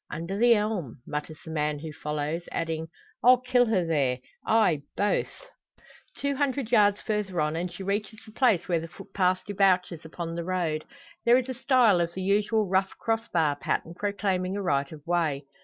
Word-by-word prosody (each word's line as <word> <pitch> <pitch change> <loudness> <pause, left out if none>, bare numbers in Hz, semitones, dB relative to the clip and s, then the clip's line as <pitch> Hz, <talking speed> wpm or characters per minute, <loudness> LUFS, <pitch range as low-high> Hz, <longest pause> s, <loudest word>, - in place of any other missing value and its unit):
"Under 170 +5 -4
the 235 +3 +5
elm," 210 - -2
mutters 150 +1 -5
the 160 - -7
man 150 -1 -1
who 155 +1 -7
follows, 150 +3 -3
adding, 160 -1 -2 0.4
"I'll 250 +1 +8
kill 250 -1 +2
her 190 -6 +1
there 140 -6 +1 0.3
ay, 205 -10 +3 0.2
both!" 205 - -1 0.7
Two 280 0 -1
hundred 275 -4 -1
yards 205 -3 +4
further 210 -5 -2
on, 150 +1 0
and 175 +2 -3
she 175 +2 -8
reaches 205 +2 -2
the 215 - -13
place 215 -7 +2
where 170 -2 +1
the 165 - -6
footpath 185 +2 -1
debouches 185 -4 +1
upon 165 +1 -6
the 170 0 -3
road. 165 -4 -1 0.4
There 240 +1 +6
is 260 0 -2
a - - -2
stile 245 -7 +4
of 170 0 -2
the 190 - -3
usual 210 +3 +2
rough 190 +1 0
crossbar 175 -10 0
pattern, 165 - -2
proclaiming 195 -1 -1
a - - -2
right 140 -5 0
of 150 -2 -11
way. 160 -5 0
185 Hz, 180 wpm, -27 LUFS, 160-215 Hz, 0.7 s, I'll